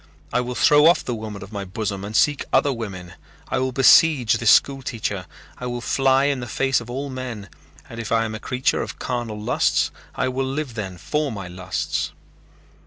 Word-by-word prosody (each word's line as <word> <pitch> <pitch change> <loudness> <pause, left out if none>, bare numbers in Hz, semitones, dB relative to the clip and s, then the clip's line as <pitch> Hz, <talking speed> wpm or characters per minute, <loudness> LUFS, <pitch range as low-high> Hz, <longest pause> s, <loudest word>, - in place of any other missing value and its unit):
I 125 - +3
will 125 0 -4
throw 150 +4 +6
off 170 - +4
the 125 - -2
woman 110 -3 -6
of 100 - -12
my 100 -2 -4
bosom 100 +1 -4
and 105 +2 -6
seek 145 +3 +3
other 140 - +3
women. 95 -7 -7 0.4
I - - 0
will 130 0 0
besiege 135 -1 +5
this 115 - +3
school 135 +3 +5
teacher. 105 -7 -4 0.3
I 125 - -4
will 120 0 -3
fly 135 +2 +2
in 140 -2 +1
the 120 - -6
face 135 +3 +1
of 120 - -11
all 135 +3 -4
men 125 -6 -6 0.4
and 115 - -9
if 115 - -5
I 115 0 +3
am 110 - -4
a 110 - -5
creature 125 +3 0
of - - -6
carnal 120 -4 -3
lusts 105 - +1 0.2
I 130 - 0
will 130 +1 -1
live 135 -1 -3
then 95 -5 -5
for 150 - -1
my 100 -4 -6
lusts." 90 0 -3
120 Hz, 205 wpm, -22 LUFS, 105-135 Hz, 0.4 s, throw